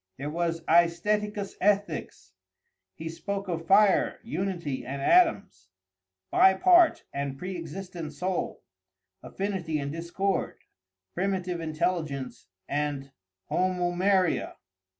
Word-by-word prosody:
There 145 Hz, +3 st, -4 dB
was 165 Hz, 0 st, -1 dB
Æstheticus 195 Hz, +5 st, +1 dB
Ethix. 205 Hz, +1 st, 0 dB, 0.6 s
He 160 Hz, -, -7 dB
spoke 195 Hz, +4 st, -4 dB
of 165 Hz, -2 st, -4 dB
fire, 200 Hz, 0 st, +4 dB
unity, 180 Hz, -, -3 dB
and 135 Hz, +3 st, -5 dB
atoms; 195 Hz, -, +2 dB, 0.6 s
bi 190 Hz, 0 st, +6 dB
part 350 Hz, -, +5 dB
and 140 Hz, -1 st, -3 dB
pre 180 Hz, +5 st, -5 dB
existent 170 Hz, -1 st, -6 dB
soul; 180 Hz, +5 st, -3 dB, 0.6 s
affinity 190 Hz, -5 st, -3 dB
and 140 Hz, -1 st, -3 dB
discord; 170 Hz, +4 st, -2 dB, 0.6 s
primitive 185 Hz, -2 st, -2 dB
intelligence 155 Hz, -4 st, -2 dB, 0.2 s
and 145 Hz, -1 st, -2 dB, 0.4 s
homoömeria. 185 Hz, +1 st, +1 dB
175 Hz, 95 wpm, -27 LUFS, 155-195 Hz, 0.6 s, bi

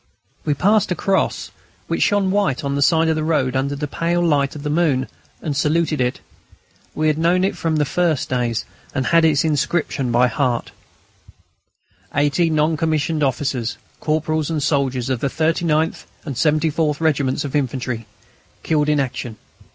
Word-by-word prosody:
We 145 Hz, -, +1 dB
passed 205 Hz, +5 st, +2 dB
a -, -, +1 dB
cross, 190 Hz, +4 st, 0 dB, 0.3 s
which -, -, -2 dB
shone 200 Hz, -2 st, +2 dB
white 195 Hz, -10 st, 0 dB
on 140 Hz, 0 st, -1 dB
the 140 Hz, -, -1 dB
side 160 Hz, +3 st, +4 dB
of 160 Hz, -, +2 dB
the 155 Hz, -, -1 dB
road 135 Hz, -5 st, +1 dB
under 140 Hz, +2 st, 0 dB
the 145 Hz, +1 st, -3 dB
pale 170 Hz, +3 st, 0 dB
light 145 Hz, -4 st, +1 dB
of 145 Hz, -, -7 dB
the 150 Hz, -, -2 dB
moon, 150 Hz, -5 st, +1 dB, 0.4 s
and 150 Hz, -4 st, -2 dB
saluted 155 Hz, 0 st, +1 dB
it. 125 Hz, 0 st, -1 dB, 0.7 s
We 155 Hz, -, -1 dB
had 155 Hz, 0 st, +2 dB
known 175 Hz, +3 st, +3 dB
it 195 Hz, -, 0 dB
from 165 Hz, -1 st, -1 dB
the 150 Hz, -1 st, +2 dB
first 165 Hz, -1 st, 0 dB
days, 120 Hz, -3 st, -1 dB, 0.3 s
and 130 Hz, -1 st, 0 dB
had 165 Hz, +7 st, +4 dB
its 150 Hz, -3 st, +3 dB
inscription 145 Hz, -4 st, 0 dB
by 120 Hz, +1 st, +4 dB
heart: 125 Hz, -3 st, -1 dB, 1.4 s
80 145 Hz, +4 st, +2 dB
NON 155 Hz, 0 st, +1 dB
COMMISSIONED 155 Hz, 0 st, 0 dB
OFFICERS, 130 Hz, -3 st, -1 dB, 0.2 s
CORPORALS, 155 Hz, 0 st, -1 dB
AND 155 Hz, -3 st, -1 dB
SOLDIERS 135 Hz, -3 st, 0 dB
OF 130 Hz, -, 0 dB
THE 140 Hz, -, 0 dB
39TH 160 Hz, +1 st, 0 dB, 0.2 s
AND 140 Hz, -4 st, -4 dB
74TH 155 Hz, +1 st, +1 dB
REGIMENTS 145 Hz, -4 st, 0 dB
OF 140 Hz, -, -4 dB
INFANTRY, 125 Hz, -4 st, -2 dB, 0.6 s
KILLED 150 Hz, -1 st, +1 dB
IN 150 Hz, -1 st, +2 dB
ACTION. 125 Hz, -4 st, -3 dB
150 Hz, 165 wpm, -20 LUFS, 135-160 Hz, 1.4 s, side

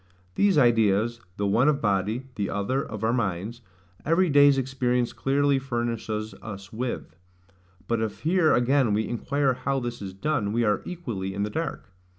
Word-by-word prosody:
These 200 Hz, -, +3 dB
ideas, 115 Hz, -2 st, +3 dB, 0.2 s
the 100 Hz, -, -1 dB
one 115 Hz, +8 st, +3 dB
of 145 Hz, -2 st, +1 dB
body, 105 Hz, +4 st, 0 dB
the 105 Hz, -4 st, -2 dB
other 115 Hz, +8 st, -1 dB
of 110 Hz, -7 st, -7 dB
our 115 Hz, +1 st, +2 dB
minds, 110 Hz, 0 st, -2 dB, 0.4 s
every 165 Hz, +2 st, +2 dB
day's 145 Hz, -1 st, +6 dB
experience 125 Hz, -2 st, 0 dB
clearly 140 Hz, 0 st, +1 dB
furnishes 115 Hz, -4 st, -3 dB
us 100 Hz, -1 st, -9 dB
with: 120 Hz, -8 st, -4 dB, 0.7 s
but 115 Hz, -1 st, 0 dB
if 110 Hz, -2 st, -4 dB
here 165 Hz, 0 st, +3 dB
again 125 Hz, -2 st, +3 dB
we 110 Hz, +1 st, 0 dB
inquire 135 Hz, +3 st, 0 dB
how 135 Hz, +2 st, -1 dB
this 120 Hz, -2 st, -5 dB
is 95 Hz, -2 st, -7 dB
done, 110 Hz, -3 st, -1 dB
we 120 Hz, +1 st, +1 dB
are 105 Hz, -2 st, +1 dB
equally 110 Hz, -, -5 dB
in 100 Hz, -, -1 dB
the 105 Hz, -, -3 dB
dark. 155 Hz, -11 st, -4 dB
120 Hz, 165 wpm, -26 LUFS, 105-135 Hz, 0.7 s, day's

